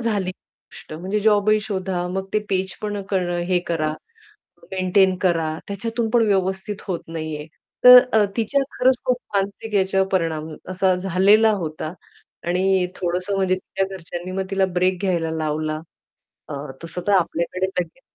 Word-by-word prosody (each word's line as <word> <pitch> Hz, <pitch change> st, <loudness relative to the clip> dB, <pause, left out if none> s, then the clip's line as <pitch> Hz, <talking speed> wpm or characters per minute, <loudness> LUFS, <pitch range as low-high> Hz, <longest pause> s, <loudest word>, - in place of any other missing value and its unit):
झाली 205 Hz, -5 st, 0 dB
गोष्ट 185 Hz, -, -16 dB
म्हणजे 185 Hz, +6 st, -2 dB
जॉबही 215 Hz, 0 st, +4 dB
शोधा, 190 Hz, -4 st, -2 dB
मग 190 Hz, +1 st, -3 dB
ते -, -, +5 dB
पेजपण 195 Hz, +2 st, -2 dB
करणं 180 Hz, -3 st, 0 dB
हे 180 Hz, -, +4 dB
करा, 155 Hz, -2 st, 0 dB, 0.8 s
मेंटेन 190 Hz, 0 st, +3 dB
करा 170 Hz, -4 st, +2 dB, 0.2 s
त्याच्यातून 225 Hz, +3 st, -2 dB
पण 235 Hz, -1 st, +4 dB
व्यवस्थित 190 Hz, +1 st, -1 dB
होत 180 Hz, -3 st, -2 dB
नाही 160 Hz, -1 st, -4 dB
आहे. 150 Hz, -, -8 dB, 0.4 s
तर 250 Hz, 0 st, +12 dB, 0.2 s
अ, 220 Hz, -1 st, +5 dB
तिच्या 255 Hz, +5 st, +1 dB
खरंच 255 Hz, +1 st, +3 dB
खूप 250 Hz, -1 st, +2 dB, 0.2 s
मानसिक 200 Hz, +2 st, -2 dB
याच्यावर 190 Hz, 0 st, +2 dB
परिणाम 160 Hz, -4 st, -1 dB, 0.2 s
असा 185 Hz, 0 st, +2 dB
झालेला 195 Hz, +4 st, +4 dB
होता. 155 Hz, +1 st, -5 dB, 0.5 s
आणि 185 Hz, +1 st, +2 dB
थोडंसं 180 Hz, +2 st, -2 dB
म्हणजे 190 Hz, -1 st, +2 dB
तिच्या 190 Hz, +1 st, -3 dB
घरच्यांनी 175 Hz, 0 st, -7 dB
मग 190 Hz, -, -1 dB
तिला 195 Hz, -1 st, +3 dB
ब्रेक 185 Hz, +1 st, +2 dB
घ्यायला 170 Hz, -4 st, 0 dB
लावला. 155 Hz, -1 st, -2 dB, 0.7 s
अ, -, -, -5 dB, 0.3 s
तसं 165 Hz, +2 st, -6 dB
तर 205 Hz, -, +3 dB
आपल्याकडे 180 Hz, 0 st, +1 dB
लगेच 180 Hz, +5 st, -4 dB
190 Hz, 150 wpm, -22 LUFS, 175-200 Hz, 0.8 s, तर